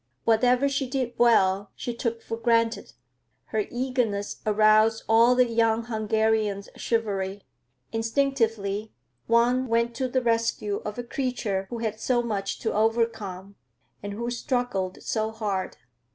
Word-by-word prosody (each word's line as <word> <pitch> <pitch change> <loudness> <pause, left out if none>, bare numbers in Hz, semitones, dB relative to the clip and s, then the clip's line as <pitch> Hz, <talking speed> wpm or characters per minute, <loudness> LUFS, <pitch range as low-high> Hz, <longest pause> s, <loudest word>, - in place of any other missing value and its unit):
Whatever 245 +4 +3
she 275 -2 -1
did 255 -3 -2
well, 200 -4 +4
she 240 - -4
took 230 -1 -3
for 225 - -4
granted. 230 0 +1 0.5
Her 425 - -1
eagerness 240 -5 -2
aroused 215 +1 +4
all 230 +2 +5
the 250 0 +5
young 230 -1 +1
Hungarian's 220 -2 0
chivalry. 200 -4 -2 0.5
Instinctively 225 -4 0 0.3
one 245 +3 +3
went 235 0 +1
to 260 - 0
the 255 0 0
rescue 230 -3 0
of 210 +1 -5
a 245 - -3
creature 235 -7 -2
who 240 - -4
had 220 -1 -3
so 240 +1 +1
much 200 -4 -2
to 225 - -1
overcome 215 -3 -1 0.4
and 205 0 -5
who 235 +3 -3
struggled 240 -7 -2
so 220 -1 -1
hard. 210 -4 -3
225 Hz, 135 wpm, -26 LUFS, 210-240 Hz, 0.5 s, all